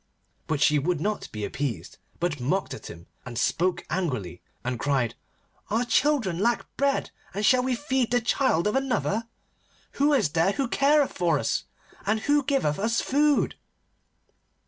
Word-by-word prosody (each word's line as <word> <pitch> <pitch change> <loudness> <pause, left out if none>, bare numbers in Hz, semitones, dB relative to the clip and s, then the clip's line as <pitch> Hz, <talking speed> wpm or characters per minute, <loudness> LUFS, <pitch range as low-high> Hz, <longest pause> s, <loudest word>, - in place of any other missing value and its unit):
But 150 -2 -1
she 150 -1 +4
would 170 +2 0
not 210 +6 -2
be 105 -1 -4
appeased, 130 +2 -4 0.2
but 170 -4 -1
mocked 150 +11 -1
at 110 - -8
him, 85 +1 -10 0.2
and 120 -2 -7
spoke 180 +8 0
angrily, 125 - -3 0.2
and 125 -1 -2
cried: 135 -4 +1 0.6
'Our 230 +4 +1
children 240 - +2
lack 235 +3 +1
bread, 280 0 0 0.2
and 205 +1 0
shall 255 +3 +5
we 255 0 0
feed 265 -2 0
the 245 - +3
child 230 -7 +1
of 210 - +1
another? 235 -4 0 0.7
Who 290 +1 +5
is 220 - +3
there 165 +6 +2
who 275 +2 -1
careth 280 +3 +3
for 170 -4 +2
us? 115 - -1 0.4
And 215 +2 0
who 290 +2 +2
giveth 260 - 0
us 230 +3 +1
food? 290 +1 +2
200 Hz, 160 wpm, -26 LUFS, -, 0.7 s, shall